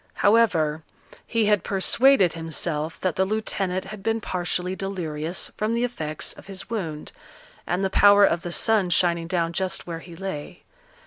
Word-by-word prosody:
However, 175 Hz, -8 st, +3 dB, 0.5 s
he 230 Hz, -2 st, +1 dB
had 210 Hz, -3 st, +2 dB
persuaded 200 Hz, -, +3 dB
himself 160 Hz, -1 st, -2 dB
that 185 Hz, -3 st, -1 dB
the 190 Hz, -, +3 dB
lieutenant 190 Hz, -2 st, -1 dB
had 205 Hz, +1 st, -8 dB
been 225 Hz, +2 st, 0 dB
partially 180 Hz, -2 st, -2 dB
delirious 175 Hz, -4 st, -3 dB
from 215 Hz, +2 st, 0 dB
the 235 Hz, -, 0 dB
effects 155 Hz, -11 st, -3 dB
of -, -, -15 dB
his 195 Hz, +2 st, -7 dB
wound, 165 Hz, -9 st, -4 dB, 0.6 s
and 180 Hz, +2 st, 0 dB
the 190 Hz, -, -1 dB
power 205 Hz, 0 st, +7 dB
of 170 Hz, -3 st, +1 dB
the 175 Hz, -, -5 dB
sun 210 Hz, 0 st, +2 dB
shining 170 Hz, 0 st, +2 dB
down 170 Hz, -2 st, -1 dB
just 185 Hz, +1 st, -2 dB
where 165 Hz, -2 st, -5 dB
he 170 Hz, 0 st, -12 dB
lay. 180 Hz, -2 st, -6 dB
185 Hz, 165 wpm, -24 LUFS, 165-205 Hz, 0.6 s, power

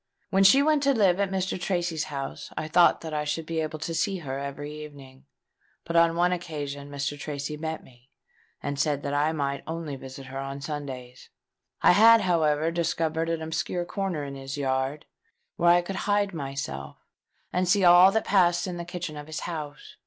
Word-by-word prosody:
When 195 Hz, 0 st, +4 dB
she 265 Hz, +9 st, +7 dB
went 305 Hz, -1 st, +3 dB
to 275 Hz, -1 st, +3 dB
live 195 Hz, -4 st, +3 dB
at 200 Hz, -1 st, +1 dB
Mr. 190 Hz, -1 st, -2 dB
Tracy's 175 Hz, -4 st, -1 dB
house, 140 Hz, -3 st, -6 dB
I 155 Hz, -, -2 dB
thought 170 Hz, +2 st, +4 dB
that 160 Hz, -1 st, -6 dB
I 150 Hz, 0 st, -1 dB
should 155 Hz, +2 st, -3 dB
be 165 Hz, 0 st, -2 dB
able 155 Hz, 0 st, -3 dB
to 155 Hz, +2 st, -4 dB
see 190 Hz, +4 st, 0 dB
her 135 Hz, -5 st, -5 dB
every 140 Hz, +1 st, -6 dB
evening; 140 Hz, -2 st, -13 dB, 0.6 s
but 170 Hz, -, -4 dB
on 170 Hz, 0 st, +5 dB
one 175 Hz, +1 st, +3 dB
occasion 145 Hz, -5 st, -5 dB
Mr. 145 Hz, 0 st, -3 dB
Tracy 145 Hz, 0 st, -4 dB
met 160 Hz, +1 st, -5 dB
me, 125 Hz, 0 st, -21 dB, 0.5 s
and 140 Hz, -1 st, -3 dB
said 145 Hz, -1 st, 0 dB
that 140 Hz, -, -2 dB
I 145 Hz, +2 st, +2 dB
might 140 Hz, -3 st, -2 dB
only 160 Hz, -3 st, -4 dB
visit 135 Hz, 0 st, -10 dB
her 135 Hz, +1 st, -6 dB
on 135 Hz, 0 st, -5 dB
Sundays. 135 Hz, -4 st, -7 dB, 0.5 s
I -, -, +8 dB
had, 225 Hz, +4 st, +7 dB
however, 160 Hz, -3 st, +2 dB
discovered 165 Hz, -1 st, -1 dB
an 165 Hz, -1 st, -2 dB
obscure 160 Hz, +2 st, -2 dB
corner 185 Hz, -5 st, -3 dB
in 140 Hz, -1 st, -6 dB
his 135 Hz, +1 st, -6 dB
yard, 135 Hz, +1 st, -1 dB, 0.5 s
where 170 Hz, 0 st, +3 dB
I 175 Hz, 0 st, +5 dB
could 190 Hz, +2 st, -5 dB
hide 205 Hz, -1 st, +2 dB
myself 135 Hz, -, -5 dB, 0.6 s
and 180 Hz, 0 st, +1 dB
see 195 Hz, +1 st, +4 dB
all 175 Hz, +2 st, +8 dB
that 220 Hz, +1 st, 0 dB
passed 175 Hz, -3 st, +3 dB
in 180 Hz, -2 st, -4 dB
the 170 Hz, -, -5 dB
kitchen 175 Hz, -3 st, -5 dB
of 145 Hz, 0 st, -8 dB
his 155 Hz, -1 st, -5 dB
house. 150 Hz, -4 st, -7 dB
155 Hz, 195 wpm, -26 LUFS, 140-175 Hz, 0.6 s, I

